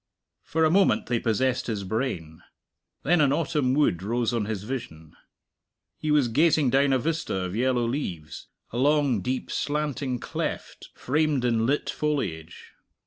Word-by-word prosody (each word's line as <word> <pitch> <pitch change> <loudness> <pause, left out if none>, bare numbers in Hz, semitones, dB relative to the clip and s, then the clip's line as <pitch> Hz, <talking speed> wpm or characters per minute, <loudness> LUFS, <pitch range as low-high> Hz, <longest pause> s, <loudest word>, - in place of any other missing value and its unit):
For 160 0 +1
a 155 - +3
moment 195 +2 +3
they 120 -1 0
possessed 125 +4 0
his 105 -4 -2
brain. 95 -7 -3 0.6
Then 175 -2 +3
an 140 -2 +4
autumn 145 -4 +1
wood 140 - +2
rose 120 +4 -1
on 115 -3 0
his 105 -2 -4
vision. 80 - -7 0.8
He 155 - -3
was 150 -4 +4
gazing 150 +2 +3
down 135 +1 +3
a 135 - +4
vista 160 +1 -2
of 90 0 -3
yellow 125 0 +1
leaves; 95 - -4 0.2
a 120 - -5
long, 140 -5 +2
deep 130 +7 -3
slanting 145 -3 -2
cleft, - - -5
framed 145 -1 0
in 115 -1 +1
lit 145 +3 0
foliage. 95 - -3
130 Hz, 150 wpm, -26 LUFS, 110-150 Hz, 0.8 s, an